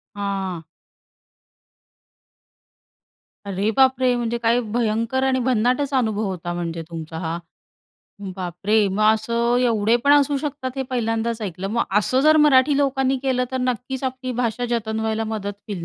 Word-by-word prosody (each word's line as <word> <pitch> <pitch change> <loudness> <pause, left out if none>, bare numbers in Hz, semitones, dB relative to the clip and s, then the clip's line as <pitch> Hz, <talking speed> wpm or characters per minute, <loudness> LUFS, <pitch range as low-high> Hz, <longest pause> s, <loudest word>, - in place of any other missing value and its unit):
हां. 195 -4 -3 2.8
अरे 200 +2 -1
बापरे! 260 -1 +4
म्हणजे 235 0 -1
काय 235 +1 +2
भयंकर 230 +2 0
आणि 260 -1 +1
भन्नाटच 255 +3 +1
अनुभव 220 -2 -1
होता 175 -2 -4
म्हणजे 170 -1 -4
तुमचा 160 -1 -7
हा. 165 0 -3 1.0
बापरे! 195 +4 0
मग 200 +3 -1
असं 235 +2 0
एवढे 230 -1 +2
पण 285 - +6
असू 285 0 +4
शकतात, 280 -2 -4
हे 265 - -1
पहिल्यांदाच 225 -1 -1
ऐकलं. 190 -1 -4
मग 235 +1 +1 0.2
असं 255 +6 +1
जर 310 +2 +5
मराठी 275 +1 +4
लोकांनी 270 -1 +1
केलं, 255 -2 +1
तर - - -1
नक्कीच 250 +1 -2
आपली 255 0 -3
भाषा 235 +1 -1
जतन 220 -1 -1
व्हायला 220 0 -1
मदत 205 -1 -5
होईल, 180 -5 -4
230 Hz, 140 wpm, -22 LUFS, 205-260 Hz, 2.8 s, पण